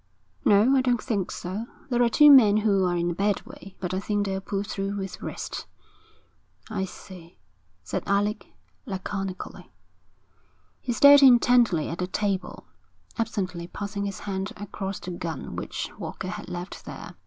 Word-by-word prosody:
'No, 215 +7 +5
I 265 - +4
don't 245 -2 +1
think 205 -7 -2
so. 200 +6 -5 0.2
There 245 0 +2
are 240 - +4
two 295 +5 +7
men 215 -7 +8
who 200 -3 +2
are 175 -1 +1
in 175 0 0
a - - -2
bad 200 +3 0
way, 260 -7 -12
but 180 -1 -3
I 190 - 0
think 205 +1 -1
they'll 190 -1 -2
pull 195 0 -3
through 200 -1 -3
with 195 -1 -6
rest.' - - -6 1.0
'I 195 -3 -1
see,' 180 -2 -12 0.5
said - - -3
Alec, 205 +2 0 0.4
laconically. 195 -1 -5 1.1
He 250 - -3
stared 285 +4 +8
intently 240 - +5
at 165 - -5
the 180 - -1
table, 190 -1 -2 0.5
absently 185 -6 -2
passing 200 +2 -4
his 195 -2 -5
hand 195 0 -3
across 200 -1 -5
the 180 - -7
gun 165 -4 -5
which - - -4
Walker 185 - -5
had 210 0 -7
left 180 +2 -7
there. - - -8
200 Hz, 160 wpm, -26 LUFS, 185-220 Hz, 1.1 s, men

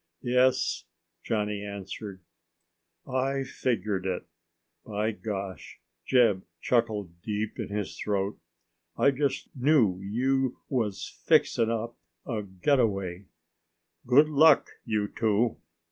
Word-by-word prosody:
"Yes," 125 -7 +2 0.4
Johnny 105 -2 -1
answered. 100 -1 -7 0.8
"I 135 +1 0
figgered 110 -7 -1
it, 90 -1 -2 0.6
by 105 +1 -1
gosh!" 100 - -6 0.3
Jeb 115 -7 +4 0.2
chuckled 105 -7 0
deep 105 +2 -3
in - - -2
his 105 -1 -3
throat. 100 -1 -1 0.6
"I 140 - +5
just 140 +1 -2
knew 125 -9 +3
you 130 +6 0
was 115 -7 -2
fixin' 115 -1 +4
up 115 +1 -3 0.3
a 110 -4 -2
getaway. 100 -2 0 0.8
Good 140 +5 +6
luck, 155 0 +5
you 105 -2 0
two!" 110 +2 +1
110 Hz, 100 wpm, -28 LUFS, 100-125 Hz, 0.8 s, Good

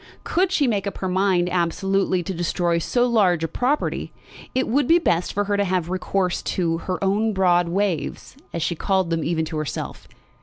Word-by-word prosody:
Could 370 +2 +1
she 300 -6 +2
make 205 -5 0
up 200 - -4
her 190 - -3
mind 185 -1 +2
absolutely 185 +1 0
to 190 - -4
destroy 175 0 0
so 240 +8 +1
large 195 -9 +2
a - - +1
property, 255 - -1 0.4
it 260 - +1
would 270 +3 +1
be 335 - +6
best 175 - +1
for 205 - 0
her 205 0 0
to 200 - +2
have 180 -3 -1
recourse 185 -1 -1
to 165 -3 -1
"her 180 - 0
own 210 +3 +1
broad 175 -2 +3
waves," 190 - -2 0.2
as 170 - -2
she 170 - 0
called 190 +1 0
them 165 -1 0
even 160 -1 0
to 160 0 -5
herself. 155 -1 -5
185 Hz, 195 wpm, -23 LUFS, 170-205 Hz, 0.4 s, be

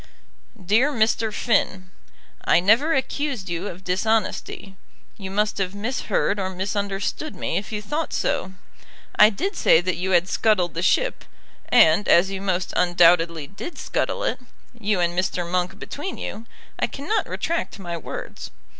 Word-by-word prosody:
DEAR 230 +10 +3
MR. 225 -3 +1
FINN, 185 -5 0 0.5
I - - +4
never 230 - +3
accused 265 -6 -2
you 170 +3 -3
of 185 -1 -8
dishonesty. 195 0 -1 0.4
You 195 -2 -7
must 210 +1 0
have 190 0 -2
misheard 210 -2 -1
or 190 -1 -1
misunderstood 200 +8 -3
me - - -3
if 200 - -5
you 210 -1 -4
thought 300 +7 -3
so. 190 - -1 0.6
I 210 - +7
did 380 - -3
say 160 - +5
that 175 0 -2
you 185 +2 -2
had 180 -1 +3
scuttled 190 -5 +1
the 170 - -3
ship; - - +1 0.5
and 160 +6 +5
as 190 +3 +5
you 195 -1 -4
most 185 -2 -1
undoubtedly 170 -3 +4
did 200 - -8
scuttle - - -2
it, - - -1 0.3
you 210 -4 -1
and 175 0 0
Mr. 180 -1 -1
Monk 180 +2 -1
between 295 - -6
you, 225 +2 -6 0.3
I - - +1
cannot 295 +11 -2
retract 335 -8 -3
my 175 -3 -5
words. 165 - -7
195 Hz, 155 wpm, -23 LUFS, 180-225 Hz, 0.6 s, I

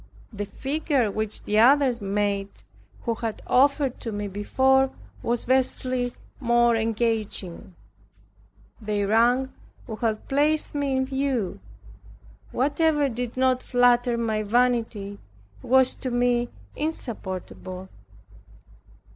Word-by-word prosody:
The 205 -1 -4
figure 275 -2 -1
which 215 +1 -3
the 210 +1 +1
others 255 0 +5
made, 200 0 -2 0.4
who 235 - 0
had 225 -1 -5
offered 275 0 +2
to 230 - -5
me 205 0 -3
before, 265 +7 +2 0.3
was 235 0 -1
vastly 255 -1 0 0.2
more 240 -2 +3
engaging. 220 -4 -2 1.1
Their 210 -1 -1
rank 245 +4 +3 0.3
would 220 -2 -7
have 220 -2 -1
placed 300 +3 +1
me 280 -2 0
in 260 - +1
view. 265 -6 -1 0.9
Whatever 295 +2 +2
did 245 0 -5
not 255 -1 +2
flatter 245 -1 +3
my 220 -2 0
vanity, 225 -3 0 0.4
was 260 +1 +4
to 260 - -4
me 245 0 +1 0.3
insupportable. 190 - -5
240 Hz, 105 wpm, -25 LUFS, 215-265 Hz, 1.1 s, others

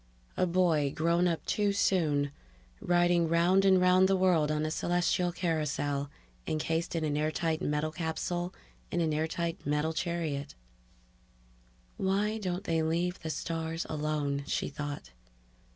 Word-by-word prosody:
A 185 - +1
boy 170 -5 +2
grown 170 +2 +2
up 165 -2 -2
too 205 -1 +1
soon, 150 -8 +1 0.5
riding 175 -1 +3
round 175 +4 +4
and 190 -1 +5
round 180 +1 +5
the 195 - +3
world 175 -5 +3
on 155 0 0
a 155 - -2
celestial 175 +1 +1
carousel, 150 -5 -1 0.4
encased 165 +2 -1
in 165 - -1
an 150 -1 0
airtight 155 +1 0
metal 150 +1 -1
capsule 175 +2 -3 0.4
in 175 - -1
an 160 -2 +1
airtight 160 +2 -2
metal 150 +2 0
chariot... 160 - -3 1.4
Why 205 +3 0
don't 185 -1 -3
they 165 -1 0
leave 170 +3 0
the 160 - -5
stars 165 +1 -3
alone? 150 -2 -1
she - - -1
thought. 145 - -6
165 Hz, 135 wpm, -30 LUFS, 155-175 Hz, 1.4 s, and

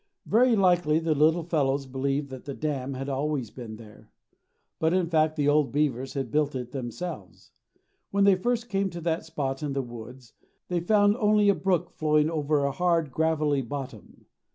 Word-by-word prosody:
Very 240 +2 +4
likely 175 -6 +3
the 160 -1 +1
little 160 +3 +3
fellows 140 -4 0
believed 135 +2 -2
that 130 -1 -9
the 140 -1 -5
dam 140 -3 -3
had 135 +1 -5
always 140 -3 -2
been 115 -4 -8
there. 110 -1 -15 0.7
But 160 +2 +2
in 185 -2 +2
fact 155 -1 +2
the 145 -1 0
old 145 -1 +3
beavers 135 -3 -1
had 135 -4 -3
built 150 0 +1
it 125 -1 -5
themselves. 125 - -7 0.6
When 200 0 +2
they 200 0 +6
first 235 +5 -1
came 195 -3 0
to 175 -1 -7
that 165 0 -1
spot 135 -1 -3
in 145 -2 -2
the 135 -1 -1
woods 120 +1 -11 0.4
they 175 -1 0
found 205 +4 +3
only 210 -2 +3
a - - +6
brook 190 -3 0
flowing 150 0 +1
over 150 -2 +1
a 140 - 0
hard, 165 -2 +1
gravelly 155 -2 +1
bottom. 135 +2 -8
150 Hz, 180 wpm, -27 LUFS, 135-175 Hz, 0.7 s, they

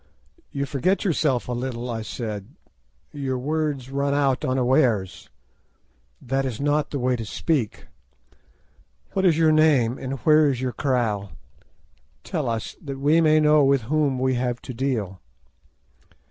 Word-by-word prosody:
"You 140 0 -2
forget 150 +10 0
yourself 150 -8 +1
a - - -4
little," 120 0 -4
I 115 -2 -3
said. 110 -3 -5 0.7
"Your 135 -3 -3
words 145 -1 -2
run 140 +1 0
out 135 -3 +1
unawares. 125 -6 +1 0.9
That 135 +2 -1
is 130 -5 -4
not 145 +1 +1
the 145 - -3
way 125 -1 +1
to 115 - -4
speak. 125 +2 -2 1.3
What 190 0 +1
is 165 -4 +4
your 160 -1 +4
name, 145 -6 +3
and 130 0 -4
where 155 +2 +5
is 130 -3 -2
your 130 -1 -2
kraal? 115 -8 -1 0.9
Tell - - -2
us, 115 -1 -4
that 140 -2 -6
we 150 +4 +3
may 155 -1 +4
know 150 -1 +5
with 135 -3 +3
whom 145 -4 +2
we 130 +1 +1
have 125 -1 -1
to 130 - -7
deal." 115 -8 -2
135 Hz, 145 wpm, -24 LUFS, 120-150 Hz, 1.3 s, where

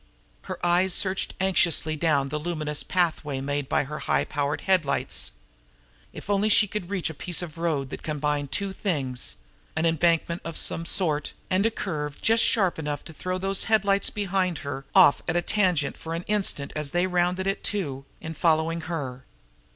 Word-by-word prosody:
Her - - -3
eyes 180 +1 +3
searched 190 -1 0
anxiously 170 -4 +2
down 145 -3 +1
the 150 +2 -2
luminous 155 -2 -2
pathway 160 -6 0
made 145 0 -2
by - - +2
her 150 +2 -6
high - - +1
powered 145 -1 -2
headlights. 185 -7 +1 0.8
If - - -10
only 205 +1 +2
she 210 0 +5
could 190 -3 -5
reach 190 -5 -1
a - - -9
piece 175 +3 -2
of 165 -1 -8
road 150 -6 -1
that - - -6
combined 150 -2 -2
two 200 -1 -1
things 140 - -2 0.4
an 160 +1 +1
embankment 170 +1 +2
of 165 -1 -5
some 165 0 -2
sort, 155 -6 0 0.2
and 190 +4 +3
a - - +2
curve 150 -9 -4
just 225 +1 +4
sharp 190 -7 +2
enough 145 -2 -3
to 160 - -9
throw 185 +4 -3
those 195 +1 0
headlights 200 -2 +3
behind 190 -4 -1 0.4
off 140 - +7
at 165 - 0
a 175 - +3
tangent 180 -8 +1
for 165 0 -5
an 170 - -4
instant 195 -9 0
as 150 -2 -2
they 175 +4 +1
rounded 180 +1 +1
it, 195 +1 -1
too, 145 -10 -2 0.2
in 160 - -6
following 165 +1 +2
her. 145 -6 -5
170 Hz, 175 wpm, -26 LUFS, 150-190 Hz, 0.8 s, off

